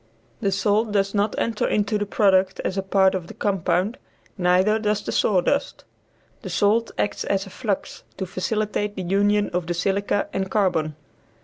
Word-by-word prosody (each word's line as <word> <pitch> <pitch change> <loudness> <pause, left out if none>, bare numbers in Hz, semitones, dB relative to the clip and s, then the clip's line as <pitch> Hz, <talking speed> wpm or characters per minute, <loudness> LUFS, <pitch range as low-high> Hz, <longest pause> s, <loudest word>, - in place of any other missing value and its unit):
The 200 -4 0
salt 210 +3 +1
does 195 -1 +1
not 205 +1 0
enter 225 -2 0
into 210 0 0
the 205 - -2
product 190 -2 +2
as 185 - -2
a 195 - 0
part 190 0 +3
of 180 -3 -3
the - - -11
compound, 190 +1 0 0.4
neither 185 +4 +3
does 210 -1 0
the - - -4
sawdust. 200 +8 +1 0.6
The - - -7
salt 220 +3 +2
acts 205 - -1
as 195 0 -1
a 195 - -12
flux 205 -4 -3 0.2
to 190 - -3
facilitate 210 +2 -2
the 190 - -4
union 205 +3 +2
of 175 -1 -2
the 175 - -1
silica 200 +3 0
and 190 0 -2
carbon. 170 -7 +1
200 Hz, 175 wpm, -23 LUFS, 185-210 Hz, 0.6 s, part